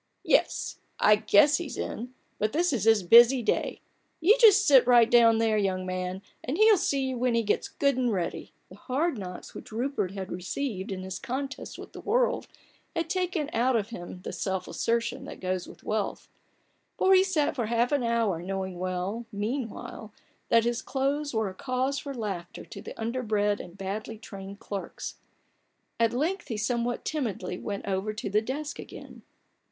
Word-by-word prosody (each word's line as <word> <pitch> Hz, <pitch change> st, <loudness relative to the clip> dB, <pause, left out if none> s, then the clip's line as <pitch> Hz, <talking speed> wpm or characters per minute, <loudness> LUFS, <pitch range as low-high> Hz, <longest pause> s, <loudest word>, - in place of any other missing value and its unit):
" -, -, -48 dB
Yes, -, -, 0 dB, 0.2 s
I 210 Hz, -, +6 dB
guess 220 Hz, +7 st, +5 dB
he's 340 Hz, -4 st, -6 dB
in, 245 Hz, +3 st, -5 dB, 0.2 s
but 215 Hz, 0 st, 0 dB
this 340 Hz, 0 st, +2 dB
is 220 Hz, -5 st, 0 dB
his 220 Hz, -3 st, +5 dB
busy 235 Hz, +6 st, +7 dB
day. -, -, -1 dB, 0.4 s
You 365 Hz, +7 st, +6 dB
just 420 Hz, -3 st, +7 dB
sit 265 Hz, -4 st, +6 dB
right 240 Hz, -2 st, +7 dB
down 230 Hz, -2 st, +6 dB
there, 220 Hz, -1 st, +2 dB
young 185 Hz, -2 st, 0 dB
man, 185 Hz, +1 st, -3 dB, 0.2 s
and 270 Hz, +6 st, -2 dB
he'll 435 Hz, +1 st, +7 dB
see 280 Hz, -8 st, 0 dB
you 255 Hz, -2 st, -3 dB
when 250 Hz, -1 st, +2 dB
he 230 Hz, -, +2 dB
gets 210 Hz, -, 0 dB
good 280 Hz, -2 st, +1 dB
and 250 Hz, -2 st, +1 dB
ready." 180 Hz, -5 st, -3 dB, 0.2 s
The 185 Hz, -, -13 dB
hard 270 Hz, +3 st, -1 dB
knocks 180 Hz, -2 st, -8 dB
which -, -, -10 dB
Rupert 240 Hz, -3 st, -1 dB
had 190 Hz, -2 st, -6 dB
received 190 Hz, +2 st, -3 dB
in 185 Hz, -1 st, -4 dB
his 190 Hz, 0 st, -5 dB
contest 270 Hz, +2 st, -5 dB
with -, -, -10 dB
the -, -, -8 dB
world -, -, +1 dB, 0.5 s
had 330 Hz, +1 st, -1 dB
taken 360 Hz, -5 st, -1 dB
out 245 Hz, +2 st, +2 dB
of 215 Hz, -2 st, 0 dB
him 180 Hz, -4 st, -8 dB
the -, -, -5 dB
self 190 Hz, -2 st, -2 dB
assertion 230 Hz, 0 st, -1 dB
that -, -, -9 dB
goes 185 Hz, -1 st, -2 dB
with -, -, -14 dB
wealth: 215 Hz, -1 st, -2 dB, 0.7 s
so 380 Hz, -, +3 dB
he 375 Hz, 0 st, +7 dB
sat 330 Hz, -8 st, 0 dB
for 240 Hz, -5 st, -1 dB
half 235 Hz, +3 st, +1 dB
an 285 Hz, -2 st, +2 dB
hour, 230 Hz, -7 st, +1 dB
knowing 190 Hz, 0 st, -4 dB
well, 185 Hz, +5 st, -3 dB
mean 225 Hz, +4 st, -2 dB
while, 215 Hz, +1 st, -9 dB, 0.4 s
that 230 Hz, -1 st, +5 dB
his 240 Hz, +1 st, 0 dB
clothes 285 Hz, +2 st, -1 dB
were 220 Hz, -2 st, 0 dB
a 190 Hz, -, -6 dB
cause 260 Hz, +6 st, -1 dB
for 280 Hz, -1 st, -6 dB
laughter 195 Hz, -7 st, -5 dB
to -, -, -9 dB
the -, -, -10 dB
underbred 220 Hz, -3 st, 0 dB
and 175 Hz, +1 st, -12 dB
badly 210 Hz, +3 st, -5 dB
trained 200 Hz, -2 st, -9 dB
clerks. 200 Hz, -2 st, -6 dB, 0.8 s
At 230 Hz, -1 st, +3 dB
length 320 Hz, +10 st, -1 dB
he 225 Hz, -, -3 dB
somewhat 235 Hz, +2 st, -1 dB
timidly 210 Hz, -11 st, -3 dB
went 200 Hz, -2 st, -5 dB
over 195 Hz, +2 st, -1 dB
to 210 Hz, -2 st, -5 dB
the 210 Hz, +1 st, +3 dB
desk 290 Hz, +6 st, -4 dB
again. -, -, -10 dB
230 Hz, 185 wpm, -28 LUFS, 200-270 Hz, 0.8 s, busy